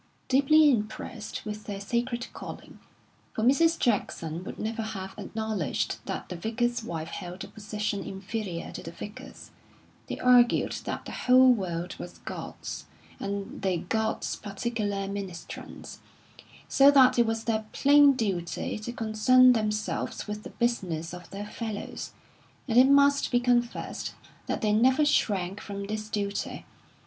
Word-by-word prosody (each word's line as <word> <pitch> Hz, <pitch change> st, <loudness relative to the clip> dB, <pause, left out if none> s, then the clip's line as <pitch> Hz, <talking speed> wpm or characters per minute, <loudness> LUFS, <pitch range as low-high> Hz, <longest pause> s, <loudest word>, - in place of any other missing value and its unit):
Deeply 290 Hz, +3 st, +5 dB
impressed 215 Hz, -1 st, -4 dB
with 210 Hz, 0 st, -6 dB
their 200 Hz, -2 st, -5 dB
sacred 240 Hz, +4 st, -2 dB
calling -, -, -9 dB, 0.6 s
for 220 Hz, -, -1 dB
Mrs. 325 Hz, +7 st, +4 dB
Jackson 175 Hz, -7 st, -1 dB
would -, -, -7 dB
never 225 Hz, +1 st, -3 dB
have 195 Hz, -3 st, -5 dB
acknowledged 220 Hz, -, -2 dB
that -, -, -4 dB
the -, -, -6 dB
Vicar's 235 Hz, +5 st, -1 dB
wife 165 Hz, -6 st, -5 dB
held 180 Hz, 0 st, -6 dB
a -, -, -8 dB
position 210 Hz, -1 st, -3 dB
inferior 195 Hz, -2 st, -5 dB
to -, -, -7 dB
the -, -, -7 dB
Vicar's 205 Hz, +5 st, -10 dB, 0.6 s
they -, -, -4 dB
argued 245 Hz, -1 st, +5 dB
that -, -, -4 dB
the -, -, -7 dB
whole 255 Hz, 0 st, +6 dB
world 180 Hz, -4 st, -3 dB
was -, -, -8 dB
God's, -, -, -7 dB, 0.3 s
and 200 Hz, 0 st, -4 dB
they 190 Hz, -2 st, +1 dB
God's 220 Hz, +6 st, -1 dB
particular 205 Hz, -1 st, -3 dB
ministrants; 195 Hz, -4 st, -7 dB, 0.7 s
so 275 Hz, +1 st, +6 dB
that 260 Hz, -3 st, +6 dB
it 235 Hz, -, +4 dB
was 225 Hz, 0 st, -1 dB
their 220 Hz, -2 st, -1 dB
plain 285 Hz, 0 st, +6 dB
duty 195 Hz, -5 st, -2 dB
to 215 Hz, +3 st, -5 dB
concern 245 Hz, +3 st, +5 dB
themselves 215 Hz, -2 st, -2 dB
with 210 Hz, 0 st, -4 dB
the -, -, -9 dB
business 180 Hz, -9 st, -1 dB
of 180 Hz, -1 st, -9 dB
their 200 Hz, +1 st, -6 dB
fellows 215 Hz, -1 st, -6 dB, 0.5 s
and 235 Hz, -1 st, +5 dB
it 260 Hz, +1 st, +7 dB
must 280 Hz, 0 st, +5 dB
be 245 Hz, -, +3 dB
confessed 245 Hz, -1 st, -1 dB, 0.3 s
that -, -, -2 dB
they 210 Hz, -1 st, +2 dB
never 260 Hz, +7 st, +4 dB
shrank 195 Hz, -8 st, +1 dB
from 200 Hz, -1 st, -6 dB
this 215 Hz, +1 st, -4 dB
duty. 200 Hz, -1 st, -3 dB
215 Hz, 145 wpm, -28 LUFS, 200-245 Hz, 0.7 s, it